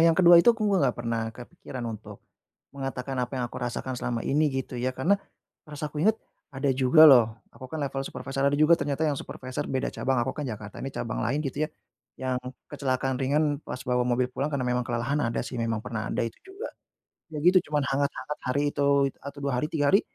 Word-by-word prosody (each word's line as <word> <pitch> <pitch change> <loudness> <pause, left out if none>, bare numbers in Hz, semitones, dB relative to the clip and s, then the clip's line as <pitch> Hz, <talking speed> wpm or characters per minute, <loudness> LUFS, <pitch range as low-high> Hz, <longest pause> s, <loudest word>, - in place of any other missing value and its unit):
yang 165 -1 +4
ke-2 175 -1 +8
itu 235 +7 +5
aku 220 - -5
nggak 180 - +2
pernah 115 -1 -2
kepikiran 125 +1 -8
untuk 110 -2 -7 0.5
mengatakan 135 -1 -4
apa 125 +1 -3
yang 125 - -1
aku - - -6
rasakan 125 +2 -3
selama 120 -1 -2
ini, 150 +2 +2
gitu 130 -2 -4
ya, 130 +1 -1
karena 185 +10 +2 0.5
merasa 150 0 -5
aku 150 - -5
ingat, 215 +6 +4 0.4
ada 135 +1 +1
juga 130 +5 +6
loh 120 -4 +7 0.3
aku 130 - -10
kan 160 - -5
level 135 -1 -2
supervisor, 135 0 -2
ada 140 - +3
juga 155 +3 +5
ternyata 145 +1 -2
yang 145 -3 0
supervisor 130 0 -5
beda 130 -1 -1
cabang. 135 0 0
Aku - - -2
kan 150 -2 -4
Jakarta, 105 -3 -7
ini 135 - -3
cabang 115 - -3
lain, 130 +5 0
gitu 145 +3 -1
ya, - - -18 0.5
yang 130 -1 -1 0.3
kecelakaan 130 -2 -1
ringan 145 +2 +1
pas 125 - -5
bawa 125 -1 +1
mobil 125 +1 +1
pulang 140 +4 -1
karena 135 -3 -1
memang 125 0 0
kelelahan, 120 +5 -1
ada 115 -3 0
sih 125 +1 -6
memang, 115 -1 -1
pernah 110 -2 -4
ada - - -1
itu 115 - -6
juga. 390 +6 -7 0.7
Ya, - - -2
gitu, 180 +3 +7
cuman 150 -1 +2
hangat-hangat 140 +2 -2
hari 135 +3 +1
itu, 140 -1 +3
atau 140 0 -7
2 140 -1 0
hari, 150 - 0
3 145 -3 +2
hari 195 - +7
135 Hz, 210 wpm, -27 LUFS, 125-150 Hz, 0.7 s, ke-2